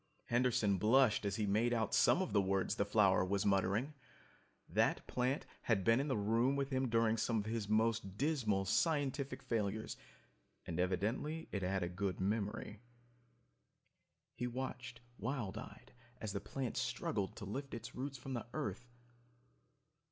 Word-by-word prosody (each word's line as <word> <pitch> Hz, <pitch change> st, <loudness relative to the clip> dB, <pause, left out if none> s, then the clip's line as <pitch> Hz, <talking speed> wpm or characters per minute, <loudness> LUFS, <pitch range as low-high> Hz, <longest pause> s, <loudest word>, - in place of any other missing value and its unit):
Henderson 120 Hz, -5 st, +2 dB
blushed 110 Hz, +1 st, +4 dB
as 100 Hz, 0 st, 0 dB
he 105 Hz, -1 st, 0 dB
made 110 Hz, +4 st, +2 dB
out 110 Hz, -2 st, 0 dB
some 190 Hz, -, +5 dB
of 185 Hz, -, -5 dB
the 100 Hz, -, +5 dB
words 95 Hz, 0 st, +1 dB
the 100 Hz, -, 0 dB
flower 100 Hz, -3 st, +4 dB
was 100 Hz, +2 st, 0 dB
muttering. 100 Hz, +8 st, +2 dB, 0.7 s
That -, -, +1 dB
plant 125 Hz, +3 st, -1 dB, 0.2 s
had 105 Hz, -5 st, +1 dB
been 115 Hz, +4 st, +4 dB
in 140 Hz, -, 0 dB
the 130 Hz, -, 0 dB
room 115 Hz, +6 st, +2 dB
with 140 Hz, 0 st, -1 dB
him 130 Hz, -1 st, +1 dB
during 115 Hz, -1 st, +3 dB
some 115 Hz, +1 st, +1 dB
of 105 Hz, -, -1 dB
his 110 Hz, -2 st, -3 dB
most 110 Hz, -2 st, +1 dB
dismal 120 Hz, -9 st, +1 dB
scientific 140 Hz, -, 0 dB
failures, 110 Hz, -2 st, -2 dB, 0.7 s
and 85 Hz, -, -4 dB
it -, -, +5 dB
evidently 110 Hz, -, -1 dB
had 95 Hz, -1 st, 0 dB
a -, -, 0 dB
good 95 Hz, +1 st, -2 dB
memory. 105 Hz, +1 st, -2 dB, 1.5 s
He 125 Hz, -, -3 dB
watched 125 Hz, -2 st, -5 dB, 0.2 s
wild 115 Hz, -2 st, -2 dB
eyed -, -, -10 dB, 0.3 s
as 110 Hz, -3 st, -4 dB
the 100 Hz, -, -2 dB
plant 130 Hz, -4 st, -4 dB
struggled 115 Hz, -6 st, -1 dB
to 105 Hz, -, -7 dB
lift 135 Hz, +7 st, -5 dB
its 115 Hz, -, -7 dB
roots 135 Hz, +2 st, -4 dB
from 135 Hz, +1 st, -6 dB
the 120 Hz, -1 st, -4 dB
earth 110 Hz, +5 st, -4 dB
110 Hz, 160 wpm, -37 LUFS, 100-130 Hz, 1.5 s, some